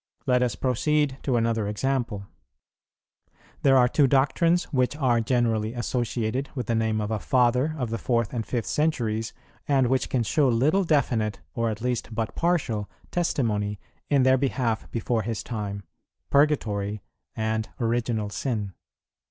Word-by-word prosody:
Let 125 -1 +3
us 125 -3 +1
proceed 135 +2 0
to 130 - 0
another 115 -2 0
example. 115 -2 -2 1.4
There 135 -1 +5
are 125 -1 +6
two 140 +2 +3
doctrines 145 +6 +3
which 130 +1 +1
are 125 -5 +2
generally 115 -2 +1
associated 120 +1 -2
with 125 -4 -3
the 115 - -1
name 110 -1 +1
of 105 0 -2
a 110 - -1
Father 125 +6 +2
of 125 -5 -3
the 115 - -2
fourth 115 -2 0
and 115 -2 -1
fifth 115 0 -3
centuries, 115 -8 0 0.4
and 135 -3 +3
which 130 +1 +1
can 125 -3 +1
show 140 +4 +2
little 145 +12 +3
definite, 120 - +1
or 115 -1 0
at 110 0 -5
least 120 -2 -2
but 110 0 -2
partial, 145 -12 0 0.2
testimony 105 - 0 0.3
in 140 -3 +4
their 130 0 +4
behalf 125 -4 -1
before 115 0 -1
his 115 -1 -3
time, 100 -3 -4 0.5
Purgatory 105 -9 +1 0.3
and 110 0 -1
Original 115 -3 -1
Sin. 105 -6 -3
120 Hz, 150 wpm, -26 LUFS, 110-135 Hz, 1.4 s, are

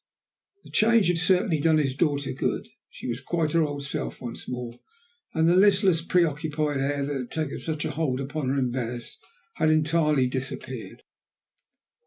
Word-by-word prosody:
The - - -14
change 220 -3 +4
had 175 -1 +1
certainly 180 -2 +2
done 160 +1 +4
his 135 -4 +1
daughter 145 -2 0
good. 130 - -2 0.2
She - - -8
was 120 +1 -3
quite 160 +1 -1
her 165 - +3
old 145 -2 -2
self 140 - -4
once 120 -2 -7
more, 120 -1 -5 0.6
and 160 0 +3
the 175 - +5
listless, 190 -3 +4
preoccupied 155 -4 +1
air 140 +1 0
that 145 0 -3
had 125 -3 -4
taken 155 -3 -3
such 155 -2 -3
a - - -1
hold 135 -3 -1
upon 135 0 -3
her 140 - 0
in 125 -2 +1
Venice 120 -1 -5 0.4
had 155 - +3
entirely 155 -3 +3
disappeared. 130 +1 -5
150 Hz, 170 wpm, -26 LUFS, 135-165 Hz, 0.6 s, the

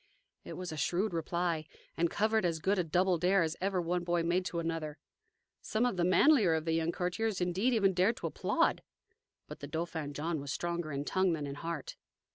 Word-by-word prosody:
It - - -8
was 180 -2 -5
a 155 - -6
shrewd 180 +7 0
reply, 165 -1 -1 0.3
and 170 0 +1
covered 220 +2 +1
as 170 -2 +1
good 190 +5 +1
a - - +2
"double 175 +2 +2
dare" 185 +1 +3
as 160 0 -2
ever 190 -1 0
one 175 +1 -1
boy 175 -1 +1
made 175 +2 +1
to 175 - -3
another. 165 -2 -3 0.6
Some 220 +3 0
of 245 - 0
the 175 - 0
manlier 185 - +5
of 160 0 -2
the 165 - 0
young 165 +1 +1
courtiers 185 +4 -1
indeed 190 +8 +1
even 195 -3 +3
dared 185 +6 +2
to - - -6
applaud. - - +1 0.7
But - - -9
the 145 - -7
Dauphin 160 -1 -4
John 160 +1 -2
was 140 -1 -5
stronger 170 -1 -3
in 140 +1 -3
tongue 185 0 +2
than 150 -3 -3
in 140 - -5
heart. 165 +1 -5
175 Hz, 210 wpm, -32 LUFS, 160-185 Hz, 0.7 s, manlier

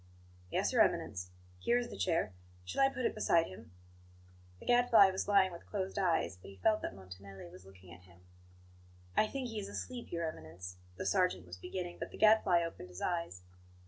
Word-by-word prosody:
"Yes, - - 0
Your - - +5
Eminence. 90 -3 +1 0.3
Here 240 - +2
is 240 -1 -2
the - - -7
chair; 165 - 0 0.3
shall 90 - -1
I 270 - +6
put 255 -2 -3
it - - +1
beside 170 -6 +3
him?" 95 -3 -11 0.9
The - - -13
Gadfly 235 -5 +6
was 190 - -3
lying 195 -2 +5
with 170 - -11
closed 195 -1 -3
eyes; 165 - +1
but - - -11
he 100 - -11
felt 215 - +2
that - - -4
Montanelli 95 -1 -11
was 90 +1 -14
looking 95 -2 -14
at 85 - -14
him. 90 -1 -20 0.9
"I 215 - +4
think 260 +1 -4
he 220 -2 -4
is 200 -1 -5
asleep, 245 +3 -6
Your 170 -1 -1
Eminence," 90 - -8 0.2
the - - -5
sergeant 180 - +2
was 90 0 -9
beginning, 175 - -5
but - - -4
the - - -11
Gadfly 215 -5 +5
opened 165 - -6
his 90 +1 -9
eyes. 170 - -2
170 Hz, 200 wpm, -34 LUFS, -, 0.9 s, I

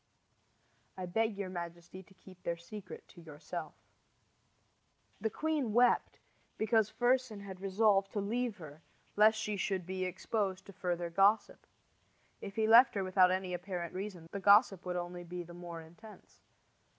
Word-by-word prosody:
I 185 - -4
beg 220 +3 0
your 200 -2 -4
majesty 170 +1 -7
to 190 +1 -20
keep 185 -1 -16
their 170 0 -2
secret 185 +4 -10
to 175 - -14
yourself. 160 +1 -7 1.4
The 220 +2 -1
queen 295 -3 -1
wept 240 +1 +3 0.4
because 220 -1 +2
Fersen 245 -3 +1
had 190 -2 -9
resolved 195 0 +2
to 210 - -1
leave 225 +2 -2
her 155 -3 -11 0.3
lest 215 +1 +5
she 210 -1 -2
should 190 -2 -2
be 185 +1 -3
exposed 190 +1 -2
to 200 - -12
further 175 -2 -3
gossip. 200 +5 +2 0.7
If 200 - -7
he 220 -1 +1
left 235 +2 +7
her 200 - 0
without 185 -1 +4
any 185 0 -1
apparent 175 -1 -4
reason, 185 -3 -6
the 200 - -4
gossip 200 -2 +5
would 180 - -2
only 175 0 -4
be 175 +1 -6
the 175 0 -12
more 170 -1 -8
intense. 210 +7 -16
190 Hz, 155 wpm, -33 LUFS, 175-215 Hz, 1.4 s, left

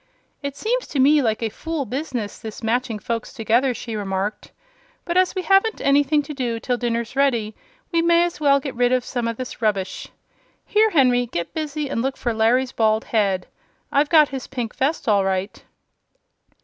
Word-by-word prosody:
"It 280 -1 -4
seems - - -1
to 285 - -3
me 290 +3 +5
like 225 -2 0
a 225 - 0
fool 320 +4 -4
business, 250 -4 -4
this 220 +1 -8
matching 235 0 0
folks 230 +2 -4
together," 240 +2 +1
she 230 0 -6
remarked; 200 0 -3 0.5
"but 345 - -2
as 370 +1 +3
we 370 - -2
haven't 390 +3 +3
anything 290 +1 +3
to 300 - -7
do 245 -4 -2
till 250 +2 -1
dinner's 235 0 -2
ready, 235 -6 +1 0.4
we 335 -1 +2
may 340 0 +4
as 345 -2 -3
well 280 -2 +4
get 275 -1 -5
rid 245 0 +2
of 255 -1 +1
some 240 -2 -2
of 230 -1 -3
this 255 -2 -7
rubbish. 205 -4 -1 0.6
Here, 435 +1 +3
Henry, 250 - +3
get 170 -7 -4
busy 305 -2 -3
and 245 -4 -2
look 265 +2 -2
for 240 - -1
Larry's 240 +4 +2
bald 220 -2 +1
head. 195 -5 0 0.5
I've 290 +1 +2
got 310 -3 +6
his 265 -1 -6
pink 245 -4 -5
vest, 280 +2 -1
all 205 -3 +4
right." 190 +1 -2
250 Hz, 190 wpm, -22 LUFS, 225-290 Hz, 0.6 s, got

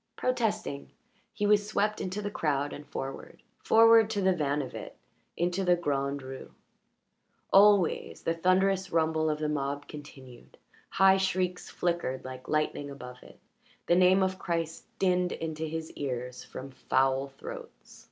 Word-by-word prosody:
Protesting, 215 - -1 0.4
he 210 - -2
was 205 0 +3
swept 215 0 0
into 195 +3 -4
the 205 - -3
crowd 145 -5 -1
and 145 - -9
forward 135 0 -7 0.2
forward 225 -1 +6
to 205 -2 -1
the 190 0 +3
van 145 -3 0
of 130 - -9
it, - - -8 0.4
into 180 +3 0
the 180 -1 +4
Grand 140 -4 -2
Rue. 130 0 -9 1.0
Always 200 -3 +4
the 165 - +1
thunderous 190 +3 +2
rumble 160 -1 +1
of 150 - 0
the 155 0 -2
mob 145 -1 -2
continued; 135 -4 -12 0.3
high 190 0 +5
shrieks 185 -1 -1
flickered 170 -7 -2
like 130 0 -9
lightning 155 -2 -1
above 125 -2 -10
it; - - -16 0.5
the 175 - +3
name 185 +1 +5
of 185 0 -1
Christ 165 -2 -3
dinned 180 -1 +1
into 160 -1 -4
his 160 0 -5
ears 125 -2 -5
from 135 +1 -9
foul 135 +1 +1
throats. 485 -1 -10
165 Hz, 150 wpm, -29 LUFS, 140-190 Hz, 1.0 s, forward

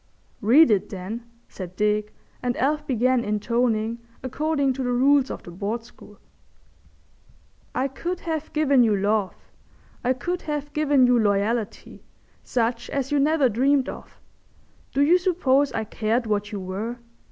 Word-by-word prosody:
"Read 245 +6 +6
it, 200 -3 +1
then," 215 +5 -7 0.2
said 185 -2 -9
Dick, 210 +1 0 0.3
and 245 -1 -1
Alf 300 +3 0
began 255 -1 +2
intoning 225 +1 0 0.2
according 280 +1 0
to 265 - -5
the 250 -1 -1
rules 270 +2 +3
of - - -6
the 175 - -10
Board 210 +6 -3
School— 210 -2 -16 1.6
"'_I 270 +1 -1
could 355 +5 -4
have 315 -2 -4
given 280 -4 +3
you 220 -3 +3
love, 200 0 0 0.7
I 250 +1 +2
could 350 +8 -3
have 295 -1 -4
given 290 -4 +3
you 245 -1 +4
loyalty, 210 +2 -1 0.4
such 235 -1 -1
as 275 0 -2
you 290 - +2
never 295 -1 +3
dreamed 265 +4 +2
of. - - -10 0.7
Do 275 - 0
you 345 +5 +5
suppose 285 -7 +2
I 220 - -2
cared 225 +2 -1
what 210 0 -1
you 205 - -4
were? 200 +6 -4
245 Hz, 150 wpm, -24 LUFS, 215-280 Hz, 1.6 s, Read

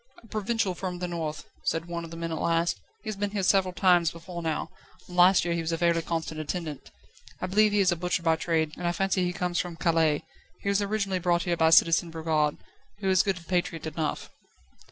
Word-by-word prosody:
"A - - -16
provincial 215 -2 -1
from 180 0 -4
the 180 0 -3
north," 160 -3 -4 0.2
said 165 0 0
one 170 -1 -4
of 165 - -8
the 165 - -8
men 165 0 -4
at 160 - -3
last; 170 0 +1 0.2
"he - - -12
has 215 - -2
been 205 +1 -2
here 200 -1 -2
several 185 0 +3
times 175 -2 +4
before 170 +1 -8
now, 160 -2 -2 0.4
and 180 - -10
last 180 +1 +6
year 170 - 0
he 170 - -1
was 165 0 -2
a 165 - 0
fairly 170 0 +2
constant 165 -1 -3
attendant. 155 -2 -5 0.5
I - - -2
believe 210 +3 +3
he 205 0 +3
is 190 -1 +4
a - - +1
butcher 175 +1 -1
by 165 -1 +3
trade, 160 -2 0
and 175 - -2
I 175 - +1
fancy 195 0 +1
he 180 - 0
comes 180 -1 -1
from 175 -2 -3
Calais. 165 -3 +2 0.4
He 200 - -2
was 200 0 +2
originally 200 -2 -1
brought 175 -1 +1
here 175 -1 0
by 160 -1 +4
Citizen 165 +1 +5
Brogard, 160 -2 0 0.4
who 195 -2 -2
is 185 - +5
good 185 -4 -2
patriot 175 -3 -1
enough." 160 0 -3
175 Hz, 230 wpm, -27 LUFS, 165-185 Hz, 0.5 s, last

